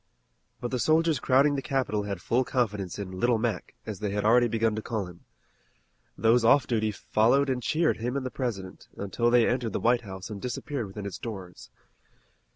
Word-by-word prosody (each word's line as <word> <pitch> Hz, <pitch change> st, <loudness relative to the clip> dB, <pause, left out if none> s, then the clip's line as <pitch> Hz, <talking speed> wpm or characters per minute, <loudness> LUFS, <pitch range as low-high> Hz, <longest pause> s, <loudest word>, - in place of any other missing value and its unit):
But 120 Hz, -, -4 dB
the 125 Hz, -, -1 dB
soldiers 160 Hz, 0 st, +3 dB
crowding 135 Hz, +4 st, +4 dB
the 140 Hz, -, -1 dB
capital 130 Hz, -7 st, -1 dB
had 100 Hz, -4 st, -5 dB
full 125 Hz, +3 st, +2 dB
confidence 105 Hz, -8 st, -1 dB
in 100 Hz, -2 st, -5 dB
"Little 120 Hz, +1 st, +3 dB
Mac," 115 Hz, -1 st, -3 dB
as 105 Hz, -3 st, -6 dB
they 105 Hz, -1 st, -2 dB
had 105 Hz, +1 st, -2 dB
already 120 Hz, +2 st, +5 dB
begun 115 Hz, -1 st, +1 dB
to 110 Hz, -, -3 dB
call 110 Hz, -3 st, -3 dB
him. 90 Hz, -1 st, -13 dB, 0.9 s
Those 115 Hz, +1 st, +4 dB
off 120 Hz, +2 st, +5 dB
duty 110 Hz, -2 st, 0 dB
followed 120 Hz, +7 st, +2 dB
and 125 Hz, -1 st, -2 dB
cheered 160 Hz, +7 st, +1 dB
him 125 Hz, +4 st, -2 dB
and 135 Hz, -, -3 dB
the 130 Hz, -, -3 dB
President, 100 Hz, -8 st, -5 dB
until 110 Hz, +4 st, 0 dB
they 120 Hz, -1 st, +5 dB
entered 120 Hz, -4 st, -1 dB
the -, -, -1 dB
White 120 Hz, +1 st, +3 dB
House 95 Hz, -1 st, -8 dB
and 100 Hz, -2 st, -6 dB
disappeared 125 Hz, 0 st, -4 dB
within 100 Hz, +1 st, -7 dB
its 95 Hz, -3 st, -6 dB
doors. 95 Hz, -6 st, -8 dB
115 Hz, 195 wpm, -27 LUFS, 105-125 Hz, 0.9 s, already